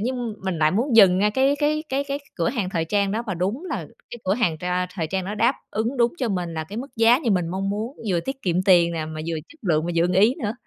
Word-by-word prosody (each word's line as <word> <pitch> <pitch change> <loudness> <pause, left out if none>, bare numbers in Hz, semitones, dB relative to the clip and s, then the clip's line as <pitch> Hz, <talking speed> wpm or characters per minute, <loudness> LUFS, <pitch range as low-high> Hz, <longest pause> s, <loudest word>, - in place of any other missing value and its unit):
nhiên 250 +5 -1 0.3
mình 190 -3 -2
lại 155 0 +4
muốn 235 +5 +1
dừng 190 -4 +7
ngay 210 +2 +3
cái 265 +5 +2
cái 305 +1 0
cái 275 +1 -1
cái 280 0 -3 0.2
cửa 165 -2 0
hàng 225 -7 -2
thời 165 -3 -1
trang 200 +2 0
đó 225 - -1
và 190 - -2
đúng 200 - -2
là - - -4 0.2
cái 240 - -7
cửa 190 +2 +2
hàng 195 -10 0
tr 180 - -9
a, 180 0 0
thời 165 -5 -2
trang 190 +2 -2
đó 205 +3 -4
đáp 235 +5 +2 0.2
ứng 225 +5 -2
đúng 240 -1 +3
cho 250 -4 -1
mình 180 -4 -2
là 160 -1 -3
cái 200 +7 -9
mức 260 +4 -5
giá 230 +2 +5
như 265 -7 -1
mình 180 -4 +1
mong 195 +2 -2
muốn, 220 +7 -4
vừa 175 -2 +1
tiết 270 +4 -6
kiệm 180 0 +1
tiền 175 -3 +5
nè, 160 -2 -3
mà 155 0 -6
vừa 165 - -2
chất 330 - -18
lượng, 160 -4 +1
mà 175 - -2
vừa 165 - +4
ưng 180 +1 +1
ý 215 +7 +4
nữa. 205 - -1
200 Hz, 300 wpm, -23 LUFS, 175-240 Hz, 0.3 s, dừng